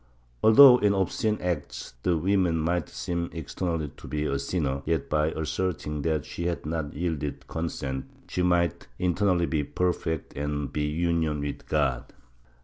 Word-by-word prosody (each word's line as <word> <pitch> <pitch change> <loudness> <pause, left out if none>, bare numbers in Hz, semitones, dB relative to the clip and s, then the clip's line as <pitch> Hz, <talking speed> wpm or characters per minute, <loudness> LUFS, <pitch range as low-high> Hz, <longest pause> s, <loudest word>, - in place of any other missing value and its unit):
Although 125 +3 +9
in 100 -1 +3
obscene 105 +3 0
acts 85 -8 -3
the 85 +3 +2
woman 90 -1 +2
might 85 0 0
seem 85 -1 -3
externally 80 -1 -3
to - - -11
be 75 0 -2
a 70 -2 0
sinner, 70 -2 -1
yet, 80 +2 -1
by 75 0 +3
asserting 80 -1 -2
that 75 -1 0
she 85 - -5
had 85 -3 -3
not 75 -2 -3
yielded 75 -3 -3
consent, 70 -5 -4 0.2
she 90 - -2
might 85 -2 +1
internally 90 0 +2
be 80 -3 0
perfect 80 -1 -2
and 75 0 -3
be 75 0 0
in 85 +1 +1
Union 75 -2 -1
with 70 -1 -5
God. 70 -5 0
80 Hz, 155 wpm, -27 LUFS, 75-90 Hz, 0.2 s, Although